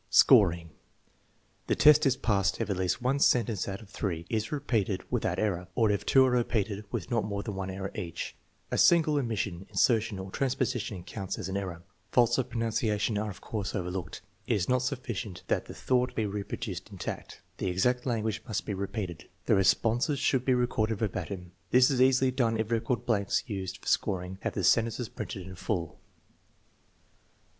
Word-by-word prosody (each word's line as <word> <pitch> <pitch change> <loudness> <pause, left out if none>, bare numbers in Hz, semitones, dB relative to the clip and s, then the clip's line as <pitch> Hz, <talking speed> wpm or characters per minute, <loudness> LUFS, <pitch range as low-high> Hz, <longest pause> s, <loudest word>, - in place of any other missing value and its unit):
Scoring. 90 - +5 1.0
The - - +2
test 150 -1 +6
is 130 -1 +2
passed 100 -3 +1
if - - -1
at - - 0
least 95 +6 -1
one 135 +3 +1
sentence 115 -7 +2
out 100 +2 -5
of 100 - -17
three 85 -5 -3
is 110 -1 -1
repeated 110 -10 -1
without - - 0
error, 90 -4 -1
or 110 -3 +3
if 100 - -2
two 135 -1 +6
are 130 - +2
repeated 110 -4 0
with - - -4
not 115 -2 +2
more 100 -1 -3
than 105 - -4
one 95 0 -4
error 95 0 -5
each. 85 -2 -5 0.4
A - - 0
single 160 -3 +5
omission, 100 -7 -3
insertion, 115 -3 +2
or 95 0 -7
transposition 125 -7 -1
counts 95 +1 -5
as - - -5
an 95 - -3
error. 90 -3 -5 0.3
Faults 120 0 +4
of 130 -1 -1
pronunciation 110 -2 0
are 105 0 -2
of 95 - -9
course 105 -4 -4
overlooked. 90 -1 -4 0.2
It - - +2
is 95 -3 0
not 125 0 +2
sufficient 120 -7 -4
that - - +1
the - - -9
thought 125 -1 0
be 110 - 0
reproduced 100 -1 -5
intact; - - -7 0.2
the - - -1
exact 125 +8 +1
language 110 -3 -1
must 110 - -2
be 105 - -2
repeated. 95 -3 -5 0.2
The - - +3
responses 115 - +3
should 130 -1 +1
be 130 - +4
recorded 115 -3 0
ver 110 0 0
batim. 90 -1 -6 0.2
This 125 +2 +5
is 130 -2 +1
easily 130 0 +4
done 115 -3 +1
if 110 +1 -2
record 115 +1 0
blanks 100 -4 +1
used 95 -4 -4
for - - -19
scoring 95 -1 -1
have - - -2
the - - -1
sentences 115 0 +2
printed 95 -3 -6
in 95 - -9
full. 90 -3 -3
110 Hz, 185 wpm, -29 LUFS, 95-125 Hz, 1.0 s, test